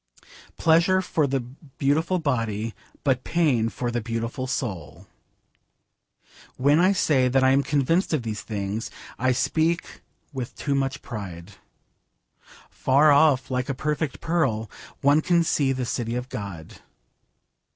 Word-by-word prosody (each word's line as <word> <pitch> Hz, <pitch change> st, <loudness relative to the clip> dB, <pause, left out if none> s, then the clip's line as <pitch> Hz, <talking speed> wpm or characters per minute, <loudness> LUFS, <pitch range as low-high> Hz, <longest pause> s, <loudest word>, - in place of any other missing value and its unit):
Pleasure 170 Hz, +3 st, +4 dB
for 155 Hz, -5 st, 0 dB
the 135 Hz, -1 st, 0 dB
beautiful 145 Hz, +6 st, -1 dB
body, 115 Hz, -, -1 dB, 0.3 s
but 130 Hz, -3 st, +1 dB
pain 135 Hz, -10 st, +1 dB
for 120 Hz, +1 st, -3 dB
the 120 Hz, 0 st, -2 dB
beautiful 115 Hz, +3 st, -3 dB
soul. 100 Hz, -, -4 dB, 1.5 s
When 145 Hz, +4 st, +4 dB
I 185 Hz, +2 st, +5 dB
say 145 Hz, -9 st, +2 dB
that 130 Hz, +1 st, +2 dB
I 130 Hz, -, +5 dB
am 135 Hz, +1 st, +4 dB
convinced 145 Hz, +6 st, +1 dB
of 150 Hz, -6 st, 0 dB
these 110 Hz, -2 st, -4 dB
things 105 Hz, 0 st, -4 dB, 0.3 s
I 130 Hz, +1 st, +2 dB
speak 160 Hz, +6 st, 0 dB, 0.3 s
with 130 Hz, -3 st, -5 dB
too 140 Hz, -, -2 dB
much 135 Hz, -1 st, -1 dB
pride. 95 Hz, -4 st, -7 dB, 1.2 s
Far 145 Hz, +3 st, +4 dB
off, 140 Hz, -3 st, +4 dB
like 125 Hz, +1 st, -1 dB
a 135 Hz, -, -1 dB
perfect 150 Hz, 0 st, -2 dB
pearl, 115 Hz, -, 0 dB, 0.3 s
one 145 Hz, +2 st, +4 dB
can 170 Hz, +1 st, +3 dB
see 140 Hz, -4 st, +1 dB
the 130 Hz, -1 st, -2 dB
city 120 Hz, 0 st, -2 dB
of 125 Hz, +1 st, -4 dB
God. 95 Hz, -6 st, -7 dB
130 Hz, 135 wpm, -24 LUFS, 115-150 Hz, 1.5 s, I